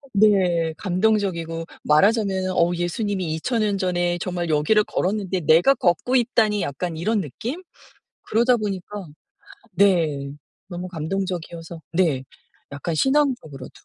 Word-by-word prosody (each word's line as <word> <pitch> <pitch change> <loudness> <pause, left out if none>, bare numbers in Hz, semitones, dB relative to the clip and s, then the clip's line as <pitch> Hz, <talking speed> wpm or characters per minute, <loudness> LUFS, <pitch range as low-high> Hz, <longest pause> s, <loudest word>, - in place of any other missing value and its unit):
네 185 -6 +3
감동적이고 180 -4 0 0.2
말하자면은 190 +3 +2
'어 170 +1 +3
예수님이 175 0 -2
2000 230 +9 -1
년 205 -2 +1
전에 175 -2 0
정말 175 -3 -3
여기를 155 +8 +3
걸었는데 190 -1 -1
내가 165 - +5
걷고 230 +5 +1
있다니.' 220 -5 +2
약간 160 +4 -4
이런 210 +6 0
느낌? 235 - -6 0.6
그러다 240 +3 +3
보니까 205 -1 -5 0.7
네 160 -8 +2 0.4
너무 180 0 -5
감동적이어서 170 -1 -5
네 160 -7 +1 0.5
약간 155 +3 -4
신앙적으로도. 265 - 0
185 Hz, 280 characters per minute, -23 LUFS, 165-210 Hz, 0.7 s, 내가